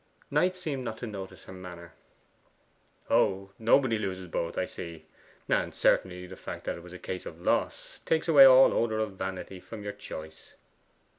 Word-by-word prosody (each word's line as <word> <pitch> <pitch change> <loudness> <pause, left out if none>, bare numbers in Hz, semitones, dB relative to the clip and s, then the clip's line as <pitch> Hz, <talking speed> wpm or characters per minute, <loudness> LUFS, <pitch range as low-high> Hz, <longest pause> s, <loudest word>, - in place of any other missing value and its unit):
Knight 185 0 +2
seemed 150 -8 -4
not 110 -2 -4
to 120 - -5
notice 100 -4 -8
her - - -11
manner. 90 -2 -10 1.1
'Oh, 95 0 +2
nobody 115 +1 +4
ever - - -5
loses 95 -1 -5
both 85 0 -3
I 95 - +1
see. 85 -3 -8 0.4
And - - 0
certainly 90 -1 +2
the 95 +1 -10
fact - - -7
that - - -2
it - - -10
was 90 +1 -12
a - - -7
case 90 0 -6
of 80 - -9
loss 90 - -1
takes 160 +1 +1
away 145 -4 +9
all 130 0 +8
odour 110 -2 +1
of 110 -1 -1
vanity 95 0 -5
from 105 +3 -9
your 105 0 -4
choice. 80 -5 -9
95 Hz, 180 wpm, -29 LUFS, 90-115 Hz, 1.1 s, away